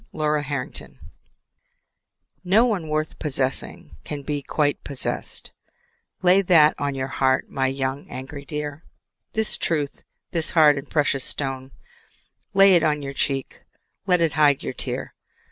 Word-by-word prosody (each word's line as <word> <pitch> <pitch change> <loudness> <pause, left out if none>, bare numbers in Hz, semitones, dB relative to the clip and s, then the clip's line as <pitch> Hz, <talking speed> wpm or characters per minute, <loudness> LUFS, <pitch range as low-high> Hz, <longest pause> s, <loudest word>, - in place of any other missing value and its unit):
0 150 -1 +1
Autoplay 145 +1 -6 1.5
No 200 +6 +4
one 200 -9 -1
worth 155 0 -2
possessing 130 - -2
Can 145 -2 -6
be 145 0 -2
quite 145 +1 0
possessed; 140 -2 -4 0.7
Lay 185 +2 +6
that 165 -5 +6
on 145 -1 -1
your 130 -1 -2
heart, 130 -1 +1
My 135 -1 +1
young 135 +1 -3
angry 135 +2 -7
dear; 150 +2 -5 0.5
This 220 0 0
truth, 150 -4 -2 0.3
this 165 -2 -1
hard 150 -4 +5
and 135 - -11
precious 145 -3 +1
stone, 135 -2 -4 0.9
Lay 195 0 +7
it 175 - +5
on 150 -2 +1
your 140 - -4
hot - - -19
cheek, 135 -2 -2 0.4
Let 180 -2 +3
it 165 -3 +2
hide 145 -3 +4
your - - -3
tear. - - -4
145 Hz, 145 wpm, -23 LUFS, 135-160 Hz, 1.5 s, Lay